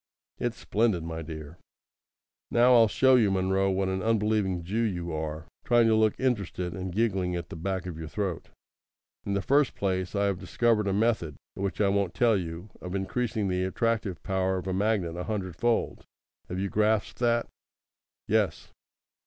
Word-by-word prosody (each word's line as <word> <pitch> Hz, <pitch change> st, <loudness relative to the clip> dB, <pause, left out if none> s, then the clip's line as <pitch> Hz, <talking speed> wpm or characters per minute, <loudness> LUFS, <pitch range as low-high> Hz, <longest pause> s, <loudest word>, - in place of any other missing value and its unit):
"It's 120 Hz, -1 st, -2 dB
splendid, 105 Hz, -6 st, +1 dB
my 80 Hz, 0 st, -5 dB
dear." 80 Hz, 0 st, -8 dB, 0.9 s
"Now 120 Hz, +2 st, +5 dB
I'll 115 Hz, -2 st, +7 dB
show 130 Hz, +5 st, +4 dB
you, 115 Hz, -5 st, +5 dB
Munro; 95 Hz, 0 st, +1 dB
what 95 Hz, 0 st, 0 dB
an 95 Hz, 0 st, -1 dB
unbelieving 105 Hz, -5 st, +1 dB
Jew 105 Hz, +7 st, -1 dB
you 90 Hz, -6 st, -2 dB
are, 80 Hz, 0 st, -4 dB, 0.2 s
trying 120 Hz, -1 st, +4 dB
to 115 Hz, -, +4 dB
look 110 Hz, -1 st, +2 dB
interested, 100 Hz, -8 st, -1 dB
and 95 Hz, +1 st, -5 dB
giggling 95 Hz, -3 st, 0 dB
at 85 Hz, -1 st, -5 dB
the -, -, -7 dB
back 95 Hz, +2 st, -3 dB
of 85 Hz, -3 st, -6 dB
your 80 Hz, -, -6 dB
throat! 95 Hz, 0 st, -3 dB, 0.8 s
In 100 Hz, -, 0 dB
the 100 Hz, -, -1 dB
first 140 Hz, +5 st, +3 dB
place, 95 Hz, -1 st, -1 dB
I 100 Hz, 0 st, +2 dB
have 100 Hz, -3 st, 0 dB
discovered 105 Hz, +3 st, +1 dB
a -, -, +1 dB
method 105 Hz, -8 st, +1 dB, 0.2 s
which 100 Hz, 0 st, -3 dB
I 100 Hz, -2 st, +3 dB
won't 100 Hz, -2 st, 0 dB
tell 115 Hz, -3 st, +4 dB
you 85 Hz, +1 st, -5 dB
of 90 Hz, +1 st, -5 dB
increasing 105 Hz, +2 st, -1 dB
the 90 Hz, 0 st, 0 dB
attractive 105 Hz, -1 st, -1 dB
power 95 Hz, 0 st, 0 dB
of 90 Hz, -, -5 dB
a 95 Hz, -, -2 dB
magnet 95 Hz, -4 st, 0 dB
a 90 Hz, -, -4 dB
hundred 95 Hz, -5 st, -3 dB
fold. 120 Hz, +4 st, 0 dB, 0.5 s
Have 90 Hz, -, -4 dB
you 95 Hz, +1 st, -1 dB
grasped 105 Hz, +1 st, +1 dB
that?" 120 Hz, -1 st, +2 dB, 0.8 s
"Yes." -, -, 0 dB
95 Hz, 180 wpm, -28 LUFS, 90-110 Hz, 0.9 s, I'll